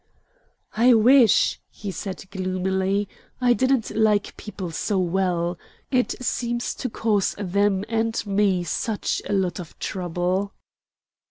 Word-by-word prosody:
"I 240 Hz, +2 st, +6 dB
wish," 235 Hz, 0 st, +5 dB
he 205 Hz, -2 st, -7 dB
said, 190 Hz, 0 st, -6 dB
gloomily, 190 Hz, +1 st, -1 dB, 0.3 s
"I 250 Hz, -1 st, +4 dB
didn't 260 Hz, -1 st, +1 dB
like 210 Hz, -2 st, +2 dB
people 190 Hz, -5 st, -7 dB
so 195 Hz, +5 st, -1 dB
well. 175 Hz, -1 st, 0 dB, 0.3 s
It 250 Hz, -2 st, +1 dB
seems 240 Hz, -1 st, -2 dB
to 255 Hz, -, -4 dB
cause 215 Hz, -3 st, 0 dB
them 200 Hz, 0 st, +1 dB
and 225 Hz, 0 st, -1 dB
me 195 Hz, -3 st, +2 dB
such 205 Hz, +7 st, -2 dB
a -, -, 0 dB
lot 190 Hz, -2 st, 0 dB
of 170 Hz, -4 st, -9 dB
trouble." 180 Hz, +2 st, -2 dB
200 Hz, 120 wpm, -24 LUFS, 185-225 Hz, 0.3 s, I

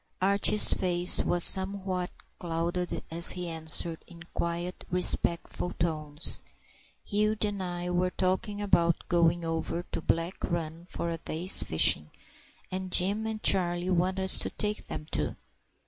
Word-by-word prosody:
Archie's 200 Hz, +2 st, +5 dB
face 180 Hz, -1 st, +2 dB
was 175 Hz, -1 st, 0 dB
somewhat 190 Hz, -1 st, +4 dB, 0.3 s
clouded 175 Hz, +1 st, -3 dB
as 170 Hz, +1 st, +3 dB
he 180 Hz, -1 st, -5 dB
answered, 160 Hz, 0 st, -2 dB
in 170 Hz, -1 st, -13 dB
quiet, 170 Hz, +1 st, -4 dB
respectful 180 Hz, -1 st, 0 dB
tones, 155 Hz, -2 st, -3 dB, 0.6 s
"Hugh 215 Hz, +1 st, 0 dB
and 205 Hz, -2 st, -2 dB
I 175 Hz, -1 st, -4 dB
were 180 Hz, +1 st, 0 dB
talking 190 Hz, +3 st, -2 dB
about 170 Hz, -4 st, +1 dB
going 170 Hz, 0 st, +2 dB
over 165 Hz, +1 st, -3 dB
to -, -, -3 dB
Black 165 Hz, +3 st, -2 dB
Run 165 Hz, -1 st, -4 dB
for 170 Hz, -1 st, -4 dB
a 165 Hz, -, -5 dB
day's 170 Hz, +4 st, +1 dB
fishing, 75 Hz, -1 st, +3 dB, 0.6 s
and 185 Hz, 0 st, -5 dB
Jim 205 Hz, +5 st, +3 dB
and 220 Hz, -1 st, -6 dB
Charlie 175 Hz, -1 st, +2 dB
want 185 Hz, +1 st, 0 dB
us 190 Hz, 0 st, +6 dB
to -, -, -2 dB
take 210 Hz, 0 st, -2 dB
them 155 Hz, -, -7 dB
too." -, -, -2 dB
175 Hz, 140 wpm, -28 LUFS, 170-190 Hz, 0.6 s, us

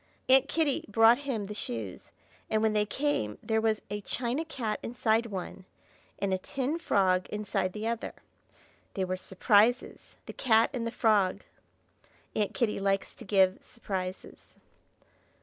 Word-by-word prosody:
Aunt 265 Hz, +1 st, +6 dB
Kitty 315 Hz, -4 st, +1 dB
brought 225 Hz, +3 st, +5 dB
him 225 Hz, -6 st, -1 dB
the 210 Hz, -, -6 dB
shoes, 115 Hz, -, -6 dB, 0.4 s
and 215 Hz, 0 st, +1 dB
when 220 Hz, -1 st, +3 dB
they 210 Hz, 0 st, +1 dB
came 235 Hz, -, -1 dB
there 220 Hz, 0 st, +1 dB
was 220 Hz, -1 st, 0 dB
a 205 Hz, 0 st, -3 dB
china 245 Hz, +8 st, -2 dB
cat 230 Hz, -9 st, -3 dB
inside 230 Hz, -1 st, 0 dB
one, 190 Hz, -2 st, -6 dB, 0.5 s
and 195 Hz, -1 st, -1 dB
a 185 Hz, -, 0 dB
tin 275 Hz, -, -3 dB
frog 185 Hz, -, +2 dB
inside 210 Hz, -3 st, -2 dB
the 215 Hz, +1 st, -5 dB
other. 230 Hz, 0 st, -3 dB, 0.8 s
They 190 Hz, -2 st, 0 dB
were 185 Hz, 0 st, -2 dB
surprises, 210 Hz, +6 st, +1 dB
the -, -, -8 dB
cat 225 Hz, -2 st, +3 dB
and 235 Hz, -3 st, -2 dB
the -, -, -3 dB
frog; 210 Hz, -6 st, +2 dB, 0.9 s
Aunt 210 Hz, -2 st, -1 dB
Kitty 235 Hz, -6 st, 0 dB
likes 195 Hz, 0 st, 0 dB
to 235 Hz, -, -12 dB
give 190 Hz, -2 st, +3 dB
surprises. 190 Hz, -5 st, -7 dB
215 Hz, 150 wpm, -29 LUFS, 195-235 Hz, 0.9 s, Aunt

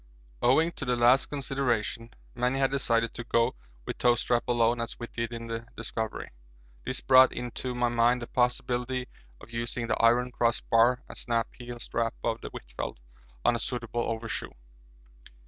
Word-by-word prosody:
Owing 155 Hz, +7 st, +4 dB
to -, -, -4 dB
the 125 Hz, -1 st, +1 dB
last 120 Hz, +3 st, +5 dB
consideration 130 Hz, -5 st, -1 dB, 0.2 s
many 125 Hz, +2 st, 0 dB
had 135 Hz, -1 st, +2 dB
decided 115 Hz, -4 st, +1 dB
to 115 Hz, -, -6 dB
go 115 Hz, 0 st, +2 dB, 0.3 s
with -, -, -5 dB
toe 120 Hz, -1 st, +5 dB
strap 120 Hz, +1 st, 0 dB
alone 120 Hz, 0 st, +2 dB
as 115 Hz, 0 st, -4 dB
we 120 Hz, -, -5 dB
did 115 Hz, 0 st, -4 dB
in 115 Hz, -1 st, -6 dB
the 115 Hz, 0 st, -5 dB
Discovery. 110 Hz, -1 st, -4 dB, 0.5 s
This -, -, -2 dB
brought 130 Hz, 0 st, +7 dB
into 125 Hz, +1 st, -4 dB
my 120 Hz, 0 st, +2 dB
mind 120 Hz, +1 st, +2 dB
the -, -, -6 dB
possibility 125 Hz, +1 st, 0 dB, 0.3 s
of 115 Hz, -, -14 dB
using 115 Hz, 0 st, -2 dB
the 115 Hz, -, 0 dB
iron 120 Hz, +2 st, +4 dB
cross 115 Hz, -1 st, +1 dB
bar 120 Hz, +2 st, +3 dB
and -, -, -10 dB
snap 115 Hz, -2 st, -1 dB
heel 120 Hz, -1 st, -8 dB
strap 115 Hz, 0 st, -2 dB
of 115 Hz, 0 st, -1 dB
the -, -, -6 dB
Huitfeldt -, -, -6 dB, 0.5 s
on 120 Hz, -, +4 dB
a -, -, -1 dB
suitable 120 Hz, -1 st, -2 dB
overshoe. 115 Hz, 0 st, -3 dB
120 Hz, 170 wpm, -28 LUFS, 115-125 Hz, 0.5 s, brought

